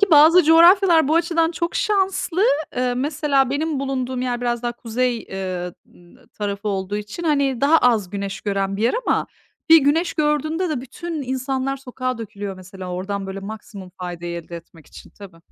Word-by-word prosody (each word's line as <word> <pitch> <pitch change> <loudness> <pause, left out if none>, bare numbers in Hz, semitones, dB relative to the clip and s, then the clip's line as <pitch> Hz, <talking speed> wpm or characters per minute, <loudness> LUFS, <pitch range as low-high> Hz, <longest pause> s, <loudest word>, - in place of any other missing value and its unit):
Ki 405 - +5
bazı 320 +4 +7
coğrafyalar 335 0 +6
bu 315 - +2
açıdan 330 -1 +2
çok 335 0 -3
şanslı. 385 -2 +1 0.3
Eee, 250 0 0
mesela 275 0 +1
benim 295 0 -1
bulunduğum 260 -2 -2
yer 245 -1 -2
biraz 240 -1 -1
daha 240 0 -1
kuzey, 240 +1 -1
eee, 185 -4 -5 0.2
ııı, 175 -1 -21
tarafı 205 0 -4
olduğu 195 0 -2
için, 210 +10 -6
hani, 280 -6 +1
daha 300 +4 +5
az 225 -9 +2
güneş 200 -1 -4
gören 195 -1 -1
bir 210 - -3
yer 235 - +2
ama - - +1 0.4
bir 325 - +10
güneş 315 +5 +1
gördüğünde 310 +4 0
de 300 -6 -2
bütün 310 +5 -6
insanlar 265 +1 -2
sokağa 255 -2 -4
dökülüyor. 205 -3 -6
Mesela 185 0 -9
oradan, 195 +2 -4
böyle, 195 0 -6
maksimum 200 -2 -9
faydayı 175 -1 -5
elde 170 +1 -9
etmek 165 -1 -15
için - - -14
tabii. 195 -4 -13
250 Hz, 175 wpm, -21 LUFS, 200-310 Hz, 0.4 s, bir